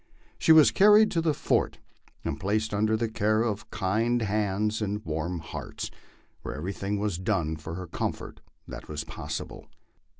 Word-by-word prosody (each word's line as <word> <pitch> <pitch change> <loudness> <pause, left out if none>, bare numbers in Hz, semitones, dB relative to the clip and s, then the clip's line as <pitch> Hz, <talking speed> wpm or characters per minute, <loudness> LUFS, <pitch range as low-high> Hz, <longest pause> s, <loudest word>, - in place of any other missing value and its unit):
She - - +4
was 155 -8 +8
carried 210 - +6
to 165 - +1
the 160 -1 +2
fort - - 0 0.5
and - - -2
placed 105 +3 0
under 110 +2 +2
the 115 +1 0
care 110 0 +1
of 105 -2 -3
kind 115 +5 0
hands 105 +1 0
and 105 0 -2
warm 80 +3 -2
hearts, 80 -1 -6 0.5
where - - -5
everything 100 +6 -3
was 100 -4 -1
done 80 -3 0
for 80 +1 -7
her 90 +1 -5
comfort 85 - -4 0.3
that - - -8
was 75 -1 -3
possible. - - -6
105 Hz, 160 wpm, -27 LUFS, 90-110 Hz, 0.5 s, was